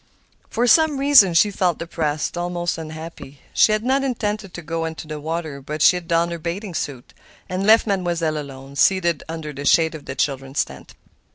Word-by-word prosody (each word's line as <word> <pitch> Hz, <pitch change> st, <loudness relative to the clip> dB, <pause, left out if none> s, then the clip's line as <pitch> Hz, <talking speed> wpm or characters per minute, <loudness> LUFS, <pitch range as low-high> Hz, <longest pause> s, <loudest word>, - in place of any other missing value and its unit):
For 240 Hz, -, 0 dB
some 305 Hz, +4 st, +4 dB
reason 270 Hz, -11 st, +6 dB
she 205 Hz, +5 st, +5 dB
felt 180 Hz, -4 st, 0 dB
depressed, 155 Hz, -2 st, -2 dB
almost 175 Hz, -1 st, -2 dB
unhappy. 160 Hz, -3 st, -9 dB
She -, -, +5 dB
had 215 Hz, 0 st, 0 dB
not 265 Hz, +2 st, +1 dB
intended 215 Hz, -6 st, -2 dB
to 175 Hz, -, -7 dB
go 165 Hz, +1 st, -3 dB
into 160 Hz, 0 st, -6 dB
the 155 Hz, -1 st, -6 dB
water; 155 Hz, -2 st, -4 dB
but 150 Hz, +2 st, -3 dB
she 180 Hz, -, +6 dB
donned 170 Hz, 0 st, 0 dB
her 170 Hz, -, -5 dB
bathing 175 Hz, +4 st, -5 dB
suit, 140 Hz, -6 st, -5 dB, 0.3 s
and 185 Hz, +2 st, -2 dB
left 225 Hz, +1 st, +6 dB
Mademoiselle 175 Hz, -6 st, -1 dB
alone, 135 Hz, -1 st, -10 dB
seated 170 Hz, +2 st, +2 dB
under 160 Hz, -2 st, -6 dB
the 140 Hz, +1 st, -7 dB
shade 160 Hz, +2 st, +3 dB
of 155 Hz, -2 st, -9 dB
the 130 Hz, -, -6 dB
children's 135 Hz, 0 st, -1 dB
tent. 65 Hz, 0 st, -13 dB
165 Hz, 185 wpm, -21 LUFS, 150-195 Hz, 0.3 s, reason